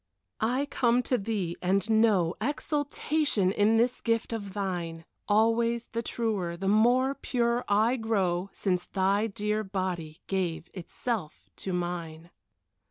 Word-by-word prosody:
I 250 +6 +1
come 250 -3 +2
to 250 - +1
thee, 195 -5 -2
and 195 +3 +1
know 215 -6 +3
Exaltation 290 - 0
in 210 +3 +3
this 240 +2 +1
gift 230 0 0
of 200 -3 -5
thine; 175 -5 -3 0.2
Always 230 +2 +2
the 230 - -2
truer, 205 -8 -2
the 195 +2 -3
more 245 +6 +4
pure 245 -3 0
I 220 +5 +3
grow 195 -5 0
Since 180 -3 -1
thy 200 +3 +1
dear 210 +1 -1
body 185 -5 -3
gave 180 -4 -2
itself 190 0 -4
to 190 - -4
mine. 175 -2 -4
210 Hz, 130 wpm, -28 LUFS, 185-235 Hz, 0.2 s, more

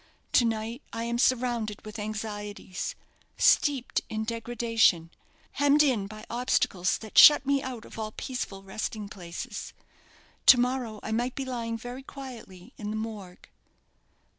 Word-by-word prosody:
To 240 - +5
night 225 +3 -2
I 230 - -4
am 235 0 -2
surrounded 240 -5 +1
with 215 +1 -7
anxieties, 210 - -5 0.4
steeped 275 -4 +3
in 220 0 -2
degradation, 230 -6 +1 0.4
hemmed 285 +1 +4
in 235 -9 +1
by 215 +1 -10
obstacles 230 -6 +1
that 220 -2 +2
shut 295 -2 +9
me 280 0 +2
out 250 -4 -6
of - - -10
all 215 -1 -3
peaceful 210 -6 -5
resting 205 +1 -5
places. 200 +4 -7 0.7
To 250 - +10
morrow 245 -4 -1
I 220 - -4
might 240 +3 -1
be 270 - -3
lying 230 -3 -3
very 245 +3 -7
quietly 245 -10 -10
in 210 - -5
the 215 - -3
Morgue." 210 -5 -7
225 Hz, 140 wpm, -28 LUFS, 210-250 Hz, 0.7 s, To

